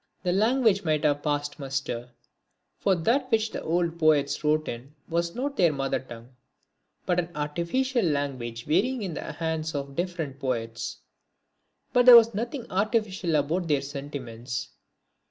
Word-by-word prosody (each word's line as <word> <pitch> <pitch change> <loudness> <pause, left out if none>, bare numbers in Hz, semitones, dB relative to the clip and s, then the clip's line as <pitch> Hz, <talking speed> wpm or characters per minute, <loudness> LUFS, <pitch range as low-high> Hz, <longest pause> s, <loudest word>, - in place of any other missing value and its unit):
The 180 -1 +1
language 220 0 +3
might 155 -3 +1
have 145 -1 +2
passed 145 -1 -2
muster; 135 -3 -3 0.7
for 195 - +3
that 245 - +1
which 220 -1 +2
the - - -5
old 170 0 -1
poets 150 -2 +3
wrote 155 +1 +2
in 125 +6 -7
was 170 0 -1
not 275 +3 -3
their 175 -3 +5
mother 135 -2 -1
tongue, 120 -2 -11 0.8
but 180 0 +2
an 175 -1 -2
artificial 170 - 0
language 135 -7 -2
varying 215 - +1
in 185 -4 -3
the - - -5
hands 160 -1 -3
of 140 -1 -4
different 170 -6 -3
poets. 115 -4 -3 1.0
But 245 0 +4
there 245 - +12
was 230 0 +5
nothing 235 +4 -3
artificial 195 -4 0
about 160 +5 0
their 145 -3 +1
sentiments. 135 -4 -6
160 Hz, 150 wpm, -27 LUFS, 140-195 Hz, 1.0 s, there